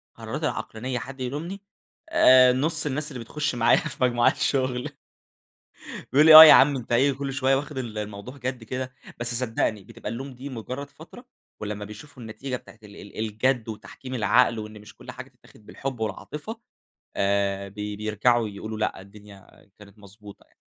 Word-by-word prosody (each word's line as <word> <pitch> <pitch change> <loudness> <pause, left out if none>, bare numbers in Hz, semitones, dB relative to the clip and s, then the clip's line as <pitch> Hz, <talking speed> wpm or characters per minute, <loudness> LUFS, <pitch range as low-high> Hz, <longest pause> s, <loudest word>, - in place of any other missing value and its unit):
قراراتي - - -5
العقلانية 125 +3 -4
حد 130 +2 -9
يلومني، 155 +10 -5 0.5
آآ 130 - +6
نص 155 +5 0
الناس 150 +2 -3
اللي 130 - -7
بتخش 145 +3 -3
معايا 115 -1 +4
في - - -4
مجموعات 120 +1 +3
الشغل. 130 -2 -1 1.2
بيقول 150 +4 +5
لي: 160 - +9
"آه، 155 - +14
يا 155 - +10
عم 140 0 +6
أنت 120 -1 -6
إيه، 135 +4 +3
كل 135 0 -5
شوية 135 0 +2
واخد 145 0 -5
ال 115 -4 -5
الموضوع 105 +5 -7
جَد 125 -2 -5
كده؟" 130 +2 -5 0.3
بس 120 0 -2
صدقني 110 -4 -1
بتبقى - - -9
اللوم 130 +3 -7
دي 135 +3 -8
مجرد 130 +3 -7
فترة، 175 +10 -14 0.4
ولمّا 105 -1 -5
بيشوفوا 120 +5 -12
النتيجة 125 +4 -5
بتاعة 115 - -15
ال 105 -1 -14
ال 100 - -12
الجَد 110 +2 -1
وتحكيم 130 +4 -8
العقل 115 +1 +3
وإن 105 0 -8
مش 105 - -15
كل - - -11
حاجة - - -10
تتاخد 105 - -22
بالحب 135 -3 -6
والعاطفة، 150 - -6 0.6
آآ 100 0 0
بي 105 +1 -6
بيرجعوا 110 +2 +1
يقولوا 110 +2 -7
لأ، 105 -3 -2
الدنيا 100 0 -16
كانت 105 0 -16
مضبوطة 100 0 -15
يعني. - - -34
125 Hz, 170 wpm, -25 LUFS, 105-135 Hz, 1.2 s, آه